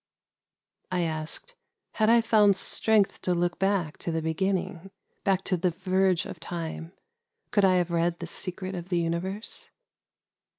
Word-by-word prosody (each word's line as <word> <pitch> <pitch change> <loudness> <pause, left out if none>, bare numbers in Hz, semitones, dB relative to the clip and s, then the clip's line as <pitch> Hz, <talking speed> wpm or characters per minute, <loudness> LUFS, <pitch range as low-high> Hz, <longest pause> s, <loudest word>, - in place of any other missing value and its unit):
I 180 -1 +1
asked: 160 - -4
— - - -56
" - - -57
Had 215 0 +4
I 235 0 +6
found 215 -3 +5
strength 210 +1 +1
to 180 - +1
look 175 0 0
back 195 -5 0
to 170 - -3
the 160 -1 -1
beginning, 180 +2 -1 0.2
— - - -45
back 190 -1 +2
to 185 - 0
the 180 +2 +1
verge 185 +1 +1
of - - -8
Time, 165 0 -5 0.3
— 470 - -53
could 205 -2 +4
I 185 -1 +5
have 175 -1 +1
read 170 0 +1
the 170 - -6
Secret 185 +2 -5
of 175 0 -6
the 175 - +1
uni 170 0 0
verse?" 195 +5 -5
180 Hz, 180 wpm, -27 LUFS, 170-195 Hz, 0.3 s, I